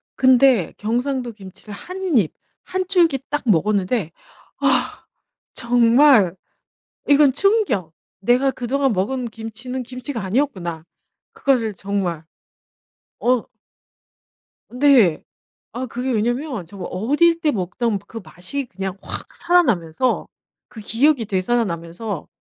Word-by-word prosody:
근데 260 - +4
경상도 245 +2 -2
김치를 195 0 -11
1 365 - -8 0.2
입 190 -9 +2 0.3
1 370 0 -3
줄기 340 -7 +4
딱 295 0 -2
먹었는데 200 -1 +1 0.5
아 255 -2 0 0.5
정말 235 - +4 0.7
이건 285 -1 +5
충격. 385 - +1 0.3
'내가 245 +6 +3
그동안 265 +2 0
먹은 240 +7 -1
김치는 230 +3 -6
김치가 250 -1 -5
아니었구나.' 190 - -2 0.5
그거를 240 -6 +1
정말 185 -4 -3 1.0
어 245 -1 +2 1.3
네. 250 - +4 0.5
아 250 +3 -3
그게 250 +2 -3
왜냐하면 240 - -1
정말 185 +1 -8
어릴 295 - +2
때 310 -3 +2
먹던 205 +2 -2
그 230 - -7
맛이 225 +13 -5
그냥 195 -3 -6
확 - - -8
살아나면서 255 - +1 0.4
그 220 - -11
기억이 245 +4 +2
되살아나면서 190 -2 -2
235 Hz, 220 characters per minute, -21 LUFS, 195-270 Hz, 1.3 s, 이건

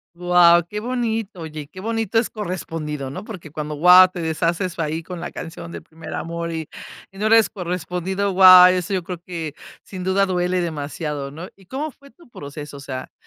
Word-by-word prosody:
Guau, 175 -1 +5
qué 210 +2 -5
bonito. 225 -5 -3
Oye, 155 -2 -7
qué 185 +5 -12
bonito 225 0 -1
es 225 - +2
correspondido, 160 -8 -5
¿no? - - -7
Porque 180 -9 -9
cuando, 150 -1 -5
guau, 180 +4 +8
te 180 - -8
deshaces 165 +3 -1
ahí 160 +1 -2
con 180 0 -7
la 175 - -6
canción 170 0 -8
del - - -8
primer 165 0 -10
amor 170 0 -4
y 160 -2 -4 0.4
no 205 +3 -2
eres 225 0 +5
correspondido. 180 +2 -3
Guau, 185 -1 +9
eso 185 +2 -2
yo 185 -2 -1
creo 180 -1 -6
que 165 -5 -6 0.3
sin 185 -2 -8
duda 190 +1 +2
duele 180 -1 0
demasiado, 150 -3 -4
¿no? 165 +6 -8
¿Y 195 -1 -21
cómo 295 +3 -4
fue 280 +1 -19
tu 335 -5 -21
proceso? 145 -4 -9
O - - -10
sea, 130 -2 -7
180 Hz, 190 wpm, -21 LUFS, 160-195 Hz, 0.4 s, Guau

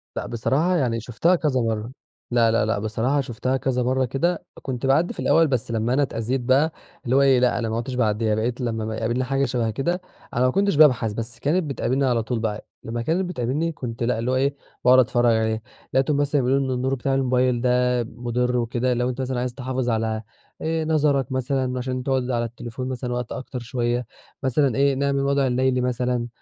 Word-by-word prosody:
لأ - - -3
بصراحة 145 +10 +1
يعني 120 -7 +1
شُفتها 125 +11 +1
كذا 145 -6 +1
مَرّة، 115 +1 -2 0.4
لا، 115 -2 +4
لا، 115 - +2
لأ، 110 -2 0
بصراحة 115 +7 0
شُفتها 130 +1 -2
كذا 125 -2 0
مَرّة 130 +1 +1
كده، 160 +8 -1 0.2
كنت 130 -1 -4
باعدّي 150 +6 +2
في - - -12
الأول 165 -1 +4
بس 125 -3 -1
لمّا 115 +2 0
أنا 145 - +3
اتأذيت 125 +1 -2
بقى 135 +6 +3 0.3
اللي 125 +2 +1
هو 140 - +5
إيه 135 -2 +5
لأ 125 0 +2
أنا 115 -2 -2
ما 110 - -2
عدتش 125 +2 -4
باعدّيها، 110 -2 +1
بقيت 120 +4 -2
لمّا 115 -2 -2
أما 110 0 -3
يقابلني 120 +3 -1
حاجة 135 +1 0
شَبه 115 -3 -1
كده 175 - -1 0.3
أنا 125 +2 +2
ما 130 - +3
كنتش 200 -1 +2
بابحث، 125 -8 +5
بس 115 +1 -6
كانت 165 +5 +1
بتقابلني 135 -1 0
على 120 -3 +1
طول 120 -1 -2
بقى 110 -1 -3 0.2
لمّا 115 +1 -3
كانت 170 +9 0
بتقابلني 150 +3 -1
كنت 120 -5 -5
لأ 115 -1 0
اللي 125 +2 -1
هو - - +1
إيه 140 +2 +1 0.3
باقعُد 130 +1 +7
اتفرّج 120 -2 +3
عليه، 110 0 0 0.3
لقيتهم 135 +2 +2
مثلًا 145 -1 +2
بيقولوا 135 +2 +2
إن - - -1
النور 130 +2 0
بتاع 135 +2 -1
الموبايل 125 -2 +2
ده 125 -1 +2
مُضر 125 +2 -2
وكده 120 +1 0
لو 125 +1 0
أنت 130 +1 -4
مثلًا 130 -1 -2
عايز 125 0 -2
تحافظ 130 -1 -2
على 110 -1 0 0.4
آآ، 160 0 -1
نظرك 145 -5 +1
مثلًا 130 0 -1
عشان 130 0 -3
تقعُد 130 -1 0
على 120 -1 0
التليفون 120 +2 -6
مثلًا 125 -1 -3
وقت 120 -1 -4
أكتر 130 -1 -5
شوية 120 0 -1 0.4
مثلًا 130 -1 +2
إيه 140 0 +3
نعمل 140 0 0
الوضع 140 -1 +2
الليلي 130 0 +1
مثلًا، 125 -1 -1
125 Hz, 210 wpm, -23 LUFS, 120-135 Hz, 0.4 s, باقعُد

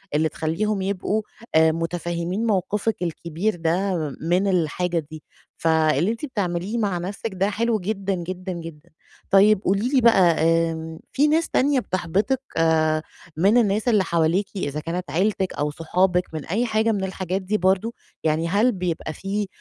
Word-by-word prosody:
اللي 155 +1 +2
تخلّيهم 195 +6 -1
يبقوا 200 +2 -1 0.3
آآ، 160 0 +6
متفهمين 170 +4 -2
موقفِك 210 +1 0
الكبير 170 +4 -2
ده 175 +3 0 0.3
من 180 +5 +1
الحاجة 175 -1 0
دي. 155 -1 -9 0.4
فاللي 160 +3 +3
أنتِ 230 +6 -4
بتعمليه 200 -3 -2
مع 200 -5 0
نَفْسك 195 +5 -4
ده 195 +2 +1
حلو 225 +1 0
جدًا، 195 0 -2
جدًا، 180 +1 -5
جدًا. 165 -1 -9 0.4
طيب 200 +1 +6
قولي 200 +6 +1
لي 270 -3 +3
بقى 185 -8 +5
آمم 165 -1 0
في 290 +2 +3
ناس 320 +2 +2
تانية 275 0 +2
بتحبطِك 195 +7 -1 0.2
آآ، 155 -1 +3 0.4
من 200 +7 +4
الناس 215 0 +2
اللي 215 -5 +4
حواليكِ 170 +3 +1
إذا 150 -5 -3
كانت 165 0 -4
عيلتِك 190 +2 0
أو 145 0 -1
صحابِك 180 +3 +1
من 155 - -5
أي 220 +8 0
حاجة 220 0 +1
من 200 -3 -1
الحاجات 190 0 -3
دي 200 +3 -1
برضه، 190 +4 +1 0.3
يعني 160 +1 +1
هل 210 +8 +3
بيبقى 175 -5 -3
فيه 200 +4 -3
185 Hz, 155 wpm, -23 LUFS, 165-210 Hz, 0.4 s, آآ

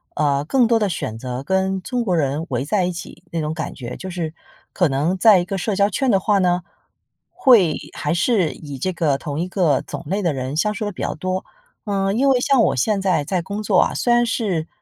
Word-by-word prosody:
呃， 145 -1 +1
更 250 - +3
多 230 0 +3
地 210 - +1
选 110 -10 -4
择 125 +2 -5
跟 190 +3 0
中 245 +5 -2
国 185 -4 +1
人 145 +1 -1
围 130 0 -1
在 185 +4 +1
一 180 - -1
起 175 - -9
那 165 - -2
种 155 0 -2
感 160 -2 -4
觉。 125 -2 -7
就 190 - -7
是 170 -3 -4 0.4
可 180 -4 +2
能 150 +7 0
在 205 0 +6
一 175 - -2
个 195 +1 -3
社 200 +2 -1
交 200 +1 +3
圈 265 +5 0
的 195 - +4
话 205 +1 +2
呢， 180 -1 +2 0.7
会 205 - +4 0.2
还 150 0 -1
是 175 -1 +2
以 145 -3 -9
这 185 +5 -1
个 155 -5 +1
同 145 +1 -5
一 175 - -1
个 175 -7 +2
种 - - -7
类 195 +6 -1
的 175 -4 +1
人 130 +1 -4
相 210 +6 +1
处 210 0 -4
得 205 - -2
比 - - -8
较 - - -1
多。 185 +4 -3 0.4
嗯， 195 0 0
因 275 +3 +3
为 260 -2 +4
像 270 -3 +3
我 - - +2
现 195 - +1
在 185 -6 +1
在 185 +3 -1
工 200 +5 -5
作 200 -3 +3
啊， - - +2
虽 240 - +2
然 240 0 +4
是， 195 -9 -1
185 Hz, 260 characters per minute, -21 LUFS, 155-205 Hz, 0.7 s, 在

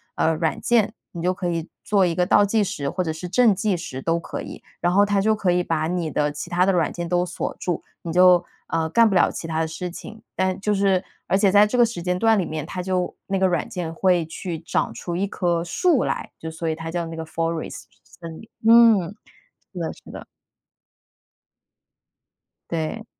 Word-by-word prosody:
呃， 160 - +2
软 160 0 -1
件， 235 -4 +2 0.2
你 170 - -7
就 180 +2 +1
可 180 -1 -3
以 165 -1 -3 0.2
做 200 -2 +3
一 175 - 0
个 180 - +2
倒 205 +2 +5
计 210 +1 +2
时 140 -7 -3
或 185 +4 -2
者 160 - -2
是 160 +3 -7
正 230 +2 +4
计 200 0 0
时 135 -6 -6
都 165 +4 0
可 - - -6
以。 - - -9 0.2
然 175 +1 +1
后 200 +2 +5
它 205 -1 +1
就 215 +2 +2
可 195 -4 +1
以 180 0 +2
把 160 -2 -1
你 170 -2 -2
的 150 0 0
其 150 +4 -7
他 180 +1 +2
的 195 - +3
软 170 -3 +1
件 170 -1 -5
都 175 0 +2
锁 180 - -4
住， 175 - -2 0.2
你 165 - -4
就 180 0 +6 0.2
呃， 165 -1 -1
干 230 +7 +5
不 195 - -1
了 - - +4
其 165 - -6
它 160 -1 -2
的 160 - 0
事 180 +3 -5
情。 220 +5 -10
但 185 0 0
就 210 +1 +1
是， 195 -2 +2 0.2
而 - - +2
且 200 -1 +3
在 205 +1 +7
这 245 - -2
个 240 - +6
时 225 -6 -5
间 180 0 0
段 225 0 +4
里 185 - 0
面， 155 -1 -4
它 180 +2 -5
就 180 -1 -2
那 195 -1 -1
个 190 - +4
软 175 -4 -1
件 170 -3 -5
会 180 0 +2
去 165 0 -5
长 165 +2 -1
出 175 - -5
一 190 +3 0
棵 175 -4 -1
树 290 - +2
来， - - -3
就 160 - -6
所 165 +1 -3
以 160 - -1
它 165 +1 -6
叫 170 0 -2
那 165 0 -7
个 160 - -5
FOREST， 165 0 -3 0.2
森 165 -2 -11
林， 225 - -13 0.2
嗯， 225 -6 +6 0.6
是 180 - -6
的， 165 - -3
是 - - -15
的。 - - -9 2.5
对。 170 +7 -3
180 Hz, 255 characters per minute, -23 LUFS, 165-195 Hz, 2.5 s, 在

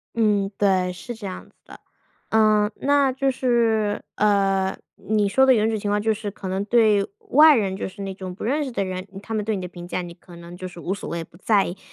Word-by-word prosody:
嗯， 210 -3 +2
对， 185 -3 +2
是 185 +7 -8
这 220 -3 -8
样 185 - -8
子 - - -31
的。 - - -13 0.5
呃， 215 -1 +3
那 280 -1 +2
就 270 +1 0
是， 230 -5 +1
呃， 195 -2 +2 0.2
你 210 -2 0
说 265 +5 +4
的 265 - +6
有 220 -2 +2
种 225 - 0
情 205 - -3
况 205 0 +1
就 220 +1 +1
是 210 -1 -5
可 195 - -8
能 190 +1 -2
对 215 -3 +3 0.2
外 305 +1 +7
人， 195 -4 0
就 - - -3
是 200 +2 -10
那 195 -1 -4
种 185 -1 -7
不 - - -8
认 285 +7 0
识 270 - -5
的 215 - -1
人。 185 +1 -5 0.2
他 225 - -6
们 215 -2 -1
对 220 -1 0
你 190 - -4
的 180 - -5
评 175 0 -10
价， 180 - -2
你 175 -1 -8
可 175 0 -16
能 170 +1 -11
就 185 0 -6
是 180 -1 -12
无 185 +3 -2
所 200 - -7
谓， 170 -1 -3
不 165 - -18
在 205 0 +2
意。 175 - -6
205 Hz, 265 characters per minute, -23 LUFS, 190-225 Hz, 0.5 s, 外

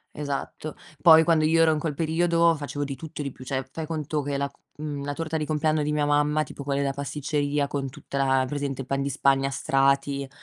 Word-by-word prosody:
Esatto, 145 +1 -4 0.3
poi 160 0 +8
quando 160 -2 +3
io 165 +1 +4
ero 160 - +5
in 155 - 0
quel 150 -2 -3
periodo 170 +1 +3
facevo 145 -1 -4
di 140 -1 -4
tutto 160 +1 -7
e - - -2
di 140 - -4
più. 130 - -12
Cioè, 130 0 -3
fai 160 +2 -5
conto 155 -1 -2
che 140 0 -2
la, 140 0 -2 0.3
ehm, 145 -2 -4
la 145 - -3
torta 160 +1 -3
di 155 - -2
compleanno 155 0 +1
di 150 - -1
mia 150 -1 +1
mamma, 150 +1 +2
tipo 140 - -9
quella 140 0 -1
della 140 -1 0
pasticceria, 145 0 -1
con 140 -1 -3
tutta 140 0 -7
la 135 -1 +3
hai - - 0
presente 140 -1 -3
il 130 - -9
pan 135 0 0
di 140 - -1
Spagna 135 0 +2
a - - -3
strati, 140 0 +1
145 Hz, 240 wpm, -26 LUFS, 140-155 Hz, 0.3 s, poi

